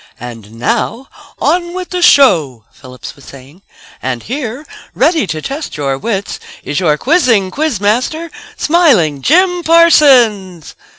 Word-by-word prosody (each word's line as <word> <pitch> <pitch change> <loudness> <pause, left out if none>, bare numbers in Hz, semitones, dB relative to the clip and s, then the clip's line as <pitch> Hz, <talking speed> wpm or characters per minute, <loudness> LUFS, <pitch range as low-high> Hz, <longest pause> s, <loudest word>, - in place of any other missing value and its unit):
"... - - -33
And 115 -3 -10
now, 225 - -3 0.3
on 345 0 -1
with 370 -1 -7
the 360 -1 -3
show," 160 - +3
Phillips 130 -1 -12
was 140 - -19
saying. 140 +6 -15 0.4
"And 125 -2 -4
here, 255 +2 -6 0.3
ready 320 - +1
to 155 -2 -5
test 285 - -6
your 140 -2 -2
wits, 200 +6 -4 0.2
is 145 - -3
your 155 -5 +1
quizzing 235 - +1
quiz 300 -5 -2
master, 255 +11 -2 0.3
Smiling 240 - +2
Jim 355 - +2
Parsons." 250 - +3
220 Hz, 135 wpm, -13 LUFS, -, 0.4 s, show